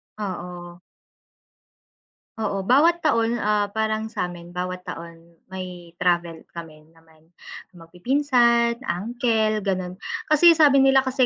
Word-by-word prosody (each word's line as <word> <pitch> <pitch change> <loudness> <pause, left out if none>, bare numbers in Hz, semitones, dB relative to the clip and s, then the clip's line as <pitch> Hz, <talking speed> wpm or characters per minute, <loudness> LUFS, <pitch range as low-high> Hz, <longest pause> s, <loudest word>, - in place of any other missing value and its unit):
Oo. 175 -3 -7 1.6
Oo, 205 -3 -2
bawat 300 - +3
taon 230 -6 +1
ah, 210 0 +1
parang 220 0 -2
sa'min 175 -4 -5
bawat 180 0 -5
taon 170 0 -11
may 180 -2 -9
travel 175 -2 -1
kami 155 -3 -10
naman 160 0 -25 0.4
magpipinsan, 235 - +1
uncle 220 +3 0
ganon. 185 -2 -3 0.3
Kasi 335 +3 +7
sabi 300 -4 +5
nila 270 0 +5
kasi 260 0 +1
195 Hz, 105 wpm, -23 LUFS, 175-235 Hz, 1.6 s, Kasi